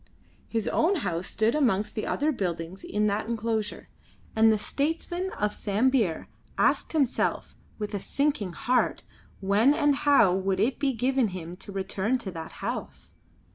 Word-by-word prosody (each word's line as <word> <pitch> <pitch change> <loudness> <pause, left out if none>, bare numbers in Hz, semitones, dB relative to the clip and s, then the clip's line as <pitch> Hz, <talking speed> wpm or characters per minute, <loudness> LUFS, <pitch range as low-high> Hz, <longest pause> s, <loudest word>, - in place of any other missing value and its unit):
His 225 -2 -2
own 360 +5 +2
house 175 -1 -2
stood 220 +2 +1
amongst 220 -8 +1
the 215 - -3
other 300 +2 +1
buildings 180 - -4
in 210 +1 0
that 210 +1 0
enclosure, 225 -2 -2 0.5
and 220 0 +6
the 215 - +3
statesman 325 - -2
of 210 0 -1
Sambir 215 -3 +1 0.3
asked - - +2
himself 280 -6 0 0.2
with 210 -1 -5
a 205 - -1
sinking 280 -7 -1
heart 250 +8 0 0.4
when 210 +9 +4
and 290 -2 +2
how 280 -12 +5
would 190 0 0
it 235 +6 +1
be 275 -2 +1
given 255 +1 +1
him 180 -3 -7
to 200 - -9
return 195 +5 -1
to 215 -6 -6
that 165 -2 -8
house. - - -5
220 Hz, 155 wpm, -27 LUFS, 195-265 Hz, 0.5 s, and